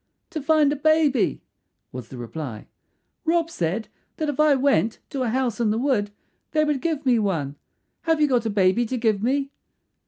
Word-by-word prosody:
"To 315 -3 -4
find 295 0 +3
a - - -2
baby," 295 -4 +2 0.5
was 125 -3 -7
the 130 - -10
reply. 120 -2 -6 0.6
"Rob 330 0 +1
said 185 - -2 0.3
that 310 -2 -1
if 290 - -4
I 305 -2 +5
went 265 -4 +2
to 275 -3 -3
a 250 - 0
house 250 -1 -1
in 230 -3 +2
the 215 - +1
wood 240 -5 +1 0.4
they 310 -1 +3
would 295 -3 0
give 310 -2 -2
me 245 -3 +4
one. 160 -9 -1 0.5
Have 325 -1 +2
you 300 - +4
got 245 -4 +1
a - - 0
baby 205 +3 +2
to 255 - -2
give 220 -4 +1
me?" 275 +4 0
255 Hz, 190 wpm, -24 LUFS, 210-295 Hz, 0.6 s, I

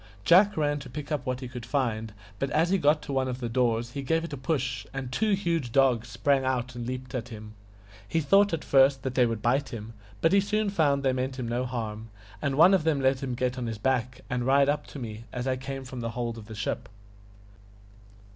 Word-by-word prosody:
Jack 195 +3 +6
ran 145 -1 +1
to 140 -2 -10
pick 150 +4 -7
up 145 -3 -2
what 130 0 -2
he 130 - -5
could 125 -1 -8
find, 115 -5 -1 0.3
but 135 - -1
as 160 +5 +2
he 195 - +3
got 150 0 +3
to 140 - -5
one 130 -1 +1
of 125 0 -4
the 120 - -3
doors 120 -1 0
he 140 - -4
gave 165 +5 0
it 170 - -6
a - - -1
push, 130 -3 -2
and 130 -2 -4
two 215 +9 +1
huge 170 - -1
dogs 125 -3 +3
sprang 135 +4 +1
out 130 -1 -1
and 120 -1 -6
leaped 130 +1 -5
at 125 -1 -4
him. 110 -1 -9 0.5
He 165 - 0
thought 195 +7 +4
at 165 - -2
first 135 -1 +4
that 130 -2 -2
they 125 -2 +4
would 115 -2 -4
bite 135 +4 +1
him, 115 -2 -7 0.3
but 165 - +3
he 200 - +6
soon 210 +1 0
found 145 -7 +2
that 135 - +3
they - - +1
meant 130 +1 -2
him 125 -3 -3
no 120 +2 -1
harm, 110 -3 -5 0.3
and 140 -1 0
one 165 +6 +7
of 190 -5 +3
them 155 -3 +2
let 130 0 +2
him 130 -3 -3
get 125 +1 -1
on 120 - -3
his 115 -1 -4
back 125 +2 -1
and 125 -1 -2
ride 140 +1 +4
up 145 - -1
to - - -9
me 115 -3 -7
as 125 0 -4
I 130 -1 +1
came 135 +1 -6
from 125 0 -7
the 115 -1 -3
hold 115 -1 -4
of 105 - -12
the 110 - -8
ship. 100 -1 -3
130 Hz, 250 wpm, -27 LUFS, 120-145 Hz, 0.5 s, one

